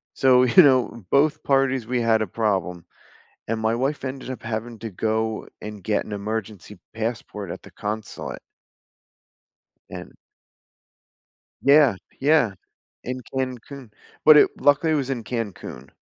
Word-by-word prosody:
So, 130 -1 +5
you 130 +9 +7
know, 130 - +2
both 150 +2 +2
parties, 135 -3 +1
we 125 +1 -1
had 115 -1 +3
a - - -1
problem 95 -4 -2 0.6
and 115 0 -2
my 110 +1 +1
wife 135 +4 -2
ended 130 0 -6
up 130 - -6
having 115 0 -5
to 115 - -6
go 110 +2 -2
and 105 -2 -8
get 105 +2 0
an 105 - -7
emergency 105 -1 -5
passport 110 -4 -4
at - - -8
the - - -14
consulate. 105 +1 -6 1.5
And - - -9 1.5
Yeah, 140 -6 +5 0.2
yeah, 140 -6 +3 0.5
in 130 +1 -4
Cancun, 130 -1 -5 0.3
but 155 -1 +9
it - - +6
luckily 145 +3 +3
it - - +2
was 135 -2 -2
in 120 -4 -3
Cancun. 100 - -6
115 Hz, 140 wpm, -23 LUFS, 110-135 Hz, 1.5 s, but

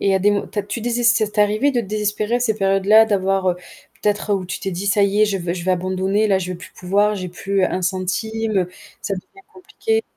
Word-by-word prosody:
Et 195 -1 +2
à 190 - +3
des 205 +2 +3
mo 205 - -1
tu - - -7
as - - +1
tu 205 +4 -5
deses 240 +1 0
ça 225 -1 +4
t'arrivait 210 +6 +2
de 250 -3 0
te - - -6
désespérer 210 +2 -1
à - - -3
ces 230 -3 +1
périodes-là? 195 +2 +5
D'avoir, 195 -3 +1
heu 175 - -3 0.5
peut-être 210 0 +1
où 190 -2 -2
tu 180 - -5
t'es 195 - -4
dit: 180 +3 -4
«Ça 200 +1 +3
y 200 +2 +2
est, - - +7
je 200 -2 -1
veux 170 -1 -3
je 175 -2 -6
vais 185 - +1
abandonner, 185 +3 0
là, 195 -2 +3
je 180 -1 -4
vais - - -6
plus - - -12
pouvoir, 200 +3 +1
j'ai 185 -2 -5
plus 195 +2 -1
1 185 - -1
centime, 200 +4 -1
heu, 180 -1 -1 0.3
ça 200 - -2
devient 390 - -12
compliqué» 445 +4 -2
200 Hz, 260 wpm, -20 LUFS, 190-220 Hz, 0.5 s, est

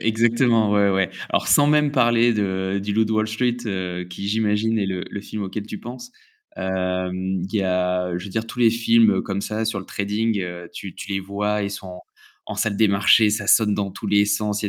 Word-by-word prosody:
Exactement, 115 0 +2
ouais, 100 -1 +3
ouais. 95 -2 +1 0.2
Alors, - - 0
sans 145 - +5
même 150 -1 +3
parler 120 -3 +3
de 95 -1 -1
du 100 - -3
Loup 110 +2 +3
de 110 - -2
Wall 110 0 +1
Street 120 +2 0
heu, 90 -3 -3
qui 90 +3 -6
j'imagine 110 +1 +1
est 100 - 0
le 95 -1 -3
le 100 - -6
film 105 0 -6
auquel 100 +2 -5
tu 105 - -7
penses. 130 - -9 0.4
Hem, 95 0 -2
il - - -10
y 100 - +2
a 90 -1 0
je 90 - -6
veux 100 - -8
dire 110 +3 -3
tous 115 +2 -9
les 120 -2 +5
films 115 0 +3
comme 100 -1 -3
ça 110 +2 -3
sur 110 -2 -2
le 95 - -12
trading, 105 +2 -1
heu, 90 -1 -6
tu 95 -3 -8
tu - - -9
les 95 - -1
vois, 105 +2 -2
ils 100 - -2
sont 100 -1 -7
en 90 0 -9 0.5
en - - -4
salle 105 -3 -1
des 110 - +4
marchés, 100 +2 +4
ça 105 -1 -2
sonne 105 -2 +4
dans 100 -1 -2
tous - - -8
les 105 0 +4
sens, 105 0 -1
il 105 - 0
y - - -1
105 Hz, 235 wpm, -22 LUFS, 95-110 Hz, 0.5 s, sans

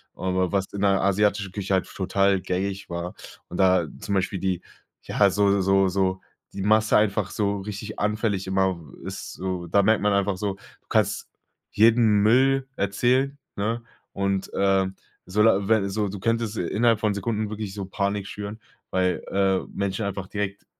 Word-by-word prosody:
Aber 95 -1 0
was 95 -1 -1
in 100 - -4
der 100 -1 +3
asiatischen 100 0 +1
Küche 100 0 -3
halt 95 - +2
f - - -15
total 95 0 +2
gängig 95 +2 -3
war. 85 +1 -4 0.4
Und 90 - -6
da 95 -3 +4
zum 100 - -2
Beispiel 95 0 -1
die 95 -1 -1 0.4
ja, 100 -1 +3
so 100 0 +3
so 95 +1 +3
so 95 0 0 0.3
die 100 - -5
Masse 110 +1 +4
einfach 105 -2 +1
so 100 -1 0
richtig 105 +1 -6
anfällig 105 -2 0
immer 95 -2 +1 0.2
ist - - -6
so. 90 -2 -4
Da 100 +4 +3
merkt 110 +2 +3
man 105 0 +2
einfach 100 -1 +1
so, 100 0 -2
du 100 - -22
kannst - - +1 0.4
jeden 110 -1 +4
Müll 135 +4 +4
erzählen, 125 +8 +1 0.2
ne? 115 +4 -1 0.3
Und, 100 -1 -1
ähm 95 -1 +2 0.4
so, 105 +2 +3
da 100 -3 +3
wenn 110 -2 +3
so, 105 0 -1
du 100 +1 -6
könntest 115 0 -1
innerhalb 110 +5 +2
von 105 -2 +1
Sekunden 105 +1 -2
wirklich 105 -2 -5
so 100 -2 -4
Panik 100 +1 -2
schüren. 105 +1 -6 0.3
Weil, 90 -1 0
äh, 95 -1 +2
Menschen 100 +2 -2
einfach 100 -1 -3
direkt 100 0 -4
100 Hz, 175 wpm, -25 LUFS, 95-105 Hz, 0.4 s, da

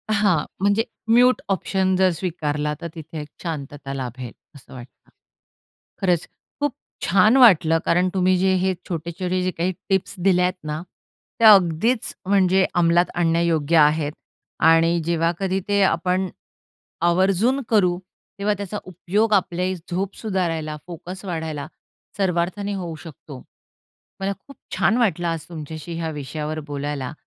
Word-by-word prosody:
हां. 190 -7 +2 0.2
म्हणजे 205 +3 +3 0.3
mute 250 +2 +5
option 190 0 0
जर 185 0 +4
स्वीकारला, 150 -4 -2
तर 170 - -4
तिथे 160 0 -8
एक 150 - -9 0.2
शांतता 145 -4 -5
लाभेल 125 -2 -6 0.2
असं 135 - -15
वाटतं. 125 0 -13 0.9
खरंच 180 -3 +1 0.3
खूप 290 -3 0 0.3
छान 215 +8 +5
वाटलं, 165 -9 +6
कारण 180 +2 +2
तुम्ही 185 -1 +3
जे 190 +1 +2
हे 190 0 +2 0.2
छोटे-छोटे 175 +2 -2
जे 185 - 0
काही 180 +2 -2 0.2
टिप्स 190 0 0
दिल्यात 180 -1 +3
ना, 150 +1 -3 0.6
त्या 220 -2 +9
अगदीच 195 +6 +2
म्हणजे 190 -1 +3
अंमलात 175 0 +4
आणण्यायोग्य 165 -2 +2
आहेत. 150 0 +4 0.5
आणि 165 +1 +4
जेव्हा 170 0 +1
कधी 190 -1 0
ते 200 -1 +2
आपण 185 +1 +1 0.8
आवर्जून 195 +9 +2
करू, 180 -5 +3 0.4
तेव्हा 205 +1 +1
त्याचा 200 +1 -4
उपयोग 195 +5 -1
आपल्याही 185 0 0 0.2
झोप 190 +2 -2
सुधारायला, 165 -7 -2
फोकस 180 +3 -8
वाढायला 160 -5 -4 0.5
सर्वार्थाने 190 +2 -1
होऊ 175 -4 -5
शकतो. 145 -4 -11 0.8
मला 195 +1 -1
खूप 280 - -16 0.2
छान 225 - +3
वाटलं 175 -7 +1
आज 165 -2 -3
तुमच्याशी 160 0 -7
ह्या 160 -1 -2
विषयावर 150 +2 -5
बोलायला 145 -2 -4
175 Hz, 130 wpm, -22 LUFS, 160-190 Hz, 0.9 s, त्या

